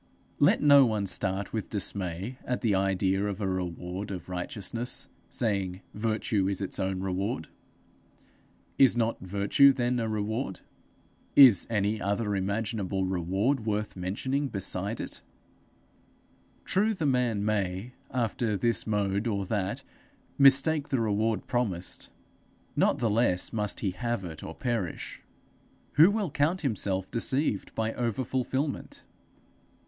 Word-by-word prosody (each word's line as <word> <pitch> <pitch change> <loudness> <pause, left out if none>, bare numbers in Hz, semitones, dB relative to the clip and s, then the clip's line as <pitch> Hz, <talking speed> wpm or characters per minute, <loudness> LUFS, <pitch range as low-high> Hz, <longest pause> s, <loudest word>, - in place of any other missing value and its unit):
Let - - +4
no 140 -2 +8
one 105 -3 -1
start 95 +1 +1
with 110 -2 -3
dismay 100 +2 -2
at 125 - -2
the 110 -3 +2
idea 95 +1 +1
of 100 -1 -4
a 100 - -1
reward 90 +1 -4
of 90 -3 -6
righteousness, 105 +6 -3 0.2
saying 100 -5 -1
virtue 110 -2 0
is 100 -1 -1
its 100 0 -3
own 95 -1 -1
reward. 95 0 -2 1.3
Is 130 -3 +6
not 115 -1 0
virtue 100 +9 +4
then 125 -1 0
a 115 -1 -1
reward? 110 0 -3 0.7
Is 125 -10 +8
any 105 -1 0
other 100 +1 -1
imaginable 100 -1 -1
reward 95 +8 0
worth 105 0 -2
mentioning 130 +10 -2
beside 100 0 -2
it? - - -6 1.4
True, 210 +3 +2
the 165 - -2
man 125 -6 +1
may, 100 +2 -1 0.2
after 115 -3 -1
this 115 +2 +1
mode 100 0 0
or 100 -3 -1
that, 100 -1 -2 0.5
mistake 140 +2 +5
the 135 - +1
reward 110 -1 0
promised; 100 -8 -2 0.7
not - - +3
the 120 - 0
less 105 -5 +2
must 105 -2 -1
he 100 - 0
have 120 +1 -3
it, 80 -3 -8
or 80 - -7
perish. 115 -9 -3 0.7
Who 160 +5 +7
will 205 -6 -1
count 160 +7 +1
himself 100 - -1
deceived 120 -2 0
by 110 0 -1
overfulfilment? 130 +4 -2
105 Hz, 130 wpm, -28 LUFS, 95-120 Hz, 1.4 s, no